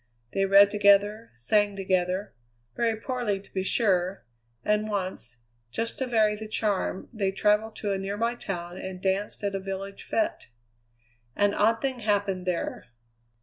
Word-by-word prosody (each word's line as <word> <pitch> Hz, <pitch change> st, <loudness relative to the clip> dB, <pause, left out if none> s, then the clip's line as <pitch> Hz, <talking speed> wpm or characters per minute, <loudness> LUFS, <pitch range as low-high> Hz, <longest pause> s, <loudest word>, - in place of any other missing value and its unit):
They 195 Hz, 0 st, +2 dB
read 200 Hz, +1 st, +7 dB
together, 205 Hz, +2 st, +4 dB
sang 205 Hz, -, +1 dB
together 185 Hz, 0 st, 0 dB, 0.4 s
very 230 Hz, -1 st, +1 dB
poorly 225 Hz, -3 st, -2 dB
to 195 Hz, -, -19 dB
be 190 Hz, -, 0 dB
sure 190 Hz, -2 st, +1 dB, 0.4 s
and 210 Hz, +1 st, +1 dB
once, 185 Hz, -, -3 dB, 0.3 s
just 230 Hz, -, -3 dB
to 260 Hz, -, -1 dB
vary 215 Hz, -3 st, +3 dB
the 215 Hz, +1 st, -7 dB
charm, 205 Hz, -3 st, -1 dB
they 200 Hz, -4 st, 0 dB
travelled 210 Hz, +2 st, +2 dB
to 205 Hz, -, -2 dB
a 195 Hz, -, -1 dB
nearby 205 Hz, +5 st, -1 dB
town 175 Hz, -6 st, -5 dB
and 190 Hz, -1 st, -6 dB
danced 195 Hz, +3 st, -1 dB
at 200 Hz, -1 st, -1 dB
a 195 Hz, -, -1 dB
village 195 Hz, +1 st, -6 dB
fête. 330 Hz, 0 st, 0 dB, 0.9 s
An 205 Hz, 0 st, +3 dB
odd 225 Hz, +2 st, +2 dB
thing 265 Hz, -2 st, -1 dB
happened 200 Hz, -4 st, 0 dB
there. 175 Hz, -7 st, -2 dB
200 Hz, 150 wpm, -27 LUFS, 190-215 Hz, 0.9 s, read